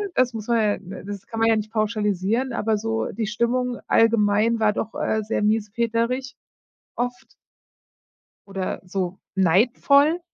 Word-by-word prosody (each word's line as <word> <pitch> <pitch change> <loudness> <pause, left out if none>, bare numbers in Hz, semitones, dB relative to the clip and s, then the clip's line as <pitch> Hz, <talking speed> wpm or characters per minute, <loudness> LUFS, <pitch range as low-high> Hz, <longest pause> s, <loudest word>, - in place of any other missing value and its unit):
das 255 -1 +2
muss 220 -2 -6
man 235 -1 +2
ja 210 -1 +1
d 195 -1 -9
das 200 -1 -7
kann 225 - -5
man 225 0 +4
ja 225 - +4
nicht 215 0 -3
pauschalisieren, 215 +2 0
aber 220 -1 0
so 225 +1 -2
die 220 -2 -3
Stimmung 240 +3 0
allgemein 225 0 +3
war 215 -1 +3
doch, 220 - -4
äh, 220 - 0
sehr 210 0 -1
miesepeterig 230 +4 0 0.6
oft 245 0 -4 1.1
oder 195 -2 -4
so 185 0 -3 0.2
neidvoll. 245 - +3
220 Hz, 145 wpm, -23 LUFS, 205-235 Hz, 1.1 s, man